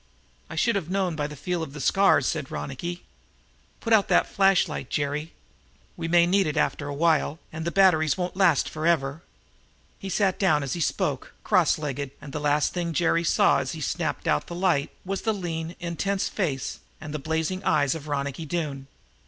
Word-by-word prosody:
"I -, -, -7 dB
should 230 Hz, +8 st, +2 dB
have 180 Hz, -5 st, -2 dB
known 185 Hz, -3 st, 0 dB
by 145 Hz, -1 st, -2 dB
the 150 Hz, -, -9 dB
feel 175 Hz, +5 st, -3 dB
of 150 Hz, -4 st, -6 dB
the 150 Hz, -, -8 dB
scars," 195 Hz, +7 st, +4 dB
said 150 Hz, -4 st, -2 dB
Ronicky. 170 Hz, +6 st, -5 dB, 0.8 s
"Put 230 Hz, -, +1 dB
out 210 Hz, -3 st, +5 dB
that -, -, +4 dB
flash 195 Hz, -1 st, +3 dB
light, -, -, -6 dB
Jerry. 150 Hz, +2 st, -2 dB, 0.6 s
We 165 Hz, -, -4 dB
may 170 Hz, 0 st, +5 dB
need 190 Hz, +1 st, +2 dB
that 150 Hz, 0 st, -2 dB
after 145 Hz, -1 st, 0 dB
a 145 Hz, -, -4 dB
while, 160 Hz, -1 st, +2 dB, 0.2 s
and 160 Hz, +1 st, -5 dB
the 170 Hz, -, -1 dB
batteries 160 Hz, -7 st, +4 dB
won't 180 Hz, -1 st, -3 dB
last 185 Hz, -7 st, +3 dB
forever." 155 Hz, -2 st, 0 dB, 0.8 s
He 195 Hz, -, -6 dB
sat 190 Hz, 0 st, +1 dB
down, 155 Hz, -7 st, +3 dB
as 135 Hz, -, -3 dB
he 170 Hz, -, -3 dB
spoke, -, -, -1 dB
cross -, -, +3 dB
legged, 140 Hz, -2 st, -4 dB
and 145 Hz, -1 st, -10 dB
the -, -, -2 dB
last 145 Hz, 0 st, +1 dB
thing 170 Hz, -2 st, -2 dB
Jerry 170 Hz, +1 st, +2 dB
saw, -, -, +4 dB
as -, -, -3 dB
he -, -, -7 dB
snapped -, -, -2 dB
out 75 Hz, -, +1 dB
the 170 Hz, -, -6 dB
light, 175 Hz, -6 st, +1 dB, 0.2 s
was 195 Hz, +1 st, -3 dB
the 220 Hz, -1 st, 0 dB
lean, 165 Hz, -3 st, -4 dB
intense 190 Hz, +3 st, -1 dB
face 145 Hz, -10 st, -2 dB, 0.2 s
and 155 Hz, -2 st, -7 dB
the 155 Hz, -, -3 dB
blazing 160 Hz, +6 st, -2 dB
eyes 145 Hz, -3 st, +2 dB
of 155 Hz, -2 st, -7 dB
Ronicky 140 Hz, +2 st, -3 dB
Doone. 145 Hz, -5 st, -3 dB
160 Hz, 195 wpm, -26 LUFS, 145-180 Hz, 0.8 s, out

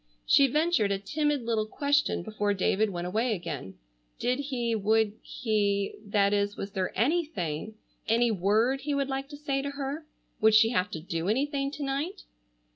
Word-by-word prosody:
She 275 Hz, -, +6 dB
ventured 295 Hz, -7 st, +2 dB
a 200 Hz, -, +1 dB
timid 290 Hz, +7 st, -1 dB
little 220 Hz, -2 st, 0 dB
question 285 Hz, -4 st, +1 dB
before 205 Hz, 0 st, -1 dB
David 205 Hz, +3 st, +2 dB
went 175 Hz, -2 st, -4 dB
away 220 Hz, +5 st, 0 dB
again: 150 Hz, -, -6 dB, 0.4 s
Did 250 Hz, +2 st, 0 dB
he, 250 Hz, -5 st, -1 dB
would 220 Hz, 0 st, +2 dB
he,—that 205 Hz, -2 st, 0 dB
is, 205 Hz, 0 st, 0 dB
was 200 Hz, -, -5 dB
there 190 Hz, -1 st, -2 dB
any 310 Hz, -, +3 dB
thing,—any 220 Hz, -, -2 dB
word 220 Hz, +7 st, +2 dB
he 290 Hz, 0 st, -1 dB
would 275 Hz, -1 st, 0 dB
like 270 Hz, +1 st, -3 dB
to 290 Hz, -, -9 dB
say 275 Hz, -2 st, -1 dB
to 280 Hz, -, -3 dB
her? 280 Hz, +2 st, -5 dB, 0.3 s
Would 220 Hz, 0 st, +5 dB
she 225 Hz, +1 st, +6 dB
have 195 Hz, -4 st, 0 dB
to 160 Hz, -, -5 dB
do 165 Hz, +2 st, -3 dB
anything 275 Hz, +4 st, 0 dB
to 290 Hz, -, -5 dB
night? 290 Hz, +8 st, -3 dB
225 Hz, 170 wpm, -28 LUFS, 200-275 Hz, 0.4 s, She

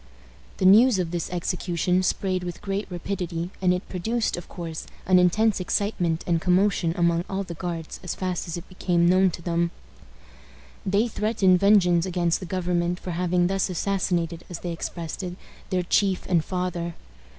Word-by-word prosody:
The 185 Hz, -, 0 dB
news 220 Hz, +4 st, +7 dB
of 175 Hz, -3 st, -1 dB
this 175 Hz, -2 st, -3 dB
execution 180 Hz, 0 st, 0 dB
spread 185 Hz, 0 st, 0 dB
with 175 Hz, -1 st, -6 dB
great 200 Hz, +1 st, -3 dB
rapidity, 175 Hz, -1 st, -4 dB
and 180 Hz, -1 st, +4 dB
it 180 Hz, 0 st, -2 dB
produced, 220 Hz, +6 st, -1 dB
of 175 Hz, -, -9 dB
course, 165 Hz, -3 st, -6 dB, 0.2 s
an 185 Hz, -1 st, +5 dB
intense 210 Hz, +4 st, +3 dB
excitement 180 Hz, -3 st, 0 dB
and 170 Hz, -2 st, +1 dB
commotion 180 Hz, -2 st, +2 dB
among 170 Hz, -1 st, +2 dB
all 195 Hz, +1 st, -2 dB
the 175 Hz, -, -7 dB
Guards 170 Hz, -1 st, -5 dB
as 180 Hz, -, -4 dB
fast 185 Hz, -2 st, -3 dB
as 170 Hz, -, -4 dB
it 170 Hz, -, -9 dB
became 175 Hz, -2 st, +1 dB
known 185 Hz, +1 st, +5 dB
to 170 Hz, 0 st, -8 dB
them. 170 Hz, 0 st, +1 dB, 1.2 s
They 200 Hz, +5 st, +2 dB
threatened 210 Hz, -5 st, +2 dB
vengeance 185 Hz, -3 st, +4 dB
against 175 Hz, -2 st, +1 dB
the 185 Hz, -, -7 dB
government 175 Hz, -1 st, -1 dB
for 180 Hz, -, -5 dB
having 175 Hz, +1 st, +1 dB
thus 195 Hz, +1 st, 0 dB
assassinated, 175 Hz, -2 st, -1 dB
as 175 Hz, -2 st, -7 dB
they 175 Hz, -, -3 dB
expressed 165 Hz, 0 st, -5 dB
it, 180 Hz, -1 st, -5 dB, 0.3 s
their 185 Hz, -2 st, 0 dB
chief 190 Hz, +1 st, +1 dB
and 170 Hz, -4 st, +2 dB
father. 180 Hz, -2 st, -3 dB
180 Hz, 170 wpm, -25 LUFS, 170-190 Hz, 1.2 s, news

